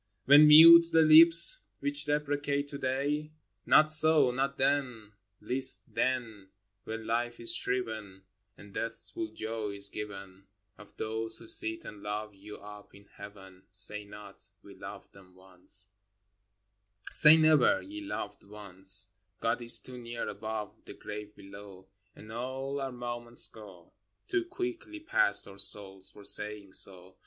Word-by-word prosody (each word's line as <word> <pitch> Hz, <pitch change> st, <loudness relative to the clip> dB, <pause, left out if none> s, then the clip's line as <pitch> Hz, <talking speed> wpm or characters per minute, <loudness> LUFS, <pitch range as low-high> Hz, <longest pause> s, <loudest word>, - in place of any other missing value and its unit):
When 145 Hz, +3 st, +6 dB
mute 165 Hz, +2 st, +8 dB
the 160 Hz, 0 st, +3 dB
lips 165 Hz, +2 st, +7 dB, 0.2 s
which 145 Hz, +1 st, -2 dB
deprecate 145 Hz, -1 st, -3 dB
to 140 Hz, -, -9 dB
day? 145 Hz, +4 st, -4 dB, 0.2 s
— 95 Hz, -1 st, -52 dB
Not 155 Hz, 0 st, +3 dB
so! 155 Hz, -4 st, +2 dB
not 135 Hz, +2 st, -4 dB
then—least 115 Hz, -3 st, -3 dB
then! 115 Hz, -4 st, -4 dB, 0.4 s
When 110 Hz, 0 st, -8 dB
Life 120 Hz, +1 st, -4 dB
is 115 Hz, -, +6 dB
shriven 110 Hz, -6 st, -4 dB, 0.3 s
And 100 Hz, -1 st, -17 dB
Death's 115 Hz, 0 st, -3 dB
full 340 Hz, -1 st, -6 dB
joy 110 Hz, -, -7 dB
is 100 Hz, 0 st, 0 dB
given, 100 Hz, -2 st, -10 dB
— 105 Hz, 0 st, -40 dB
Of 105 Hz, -, -18 dB
those 110 Hz, 0 st, -2 dB
who 115 Hz, -, -12 dB
sit 110 Hz, 0 st, 0 dB
and 105 Hz, -1 st, -12 dB
love 105 Hz, +1 st, -7 dB
you 100 Hz, +2 st, -13 dB
up 105 Hz, 0 st, -15 dB
in 100 Hz, 0 st, -19 dB
Heaven, 95 Hz, -2 st, -14 dB
Say 105 Hz, 0 st, +1 dB
not, 105 Hz, -1 st, -14 dB
" -, -, -52 dB
We -, -, -15 dB
loved -, -, -13 dB
them 95 Hz, -2 st, -20 dB
once" 95 Hz, 0 st, -6 dB, 1.2 s
Say 155 Hz, 0 st, +5 dB
never, 160 Hz, -, +2 dB
ye 315 Hz, +1 st, -10 dB
loved 105 Hz, -, -8 dB
once 100 Hz, -1 st, +3 dB
/ 90 Hz, +1 st, -52 dB
God 115 Hz, +1 st, -3 dB
is 120 Hz, 0 st, +3 dB
too 125 Hz, -1 st, -13 dB
near 120 Hz, 0 st, -7 dB
above, 110 Hz, 0 st, -7 dB
the -, -, -12 dB
grave 105 Hz, 0 st, -10 dB
below, 100 Hz, -1 st, -15 dB, 0.3 s
And 110 Hz, -, -15 dB
all 130 Hz, +4 st, -6 dB
our 135 Hz, -1 st, -5 dB
moments 120 Hz, -1 st, -4 dB
go 100 Hz, -6 st, -11 dB, 0.3 s
Too 370 Hz, -3 st, -3 dB
quickly 355 Hz, -3 st, -8 dB
past 300 Hz, -, +3 dB
our 100 Hz, 0 st, -15 dB
souls, 95 Hz, -1 st, +1 dB
for 105 Hz, -, -16 dB
saying 105 Hz, -1 st, +4 dB
so. 95 Hz, -1 st, 0 dB
110 Hz, 150 wpm, -28 LUFS, 100-140 Hz, 1.2 s, mute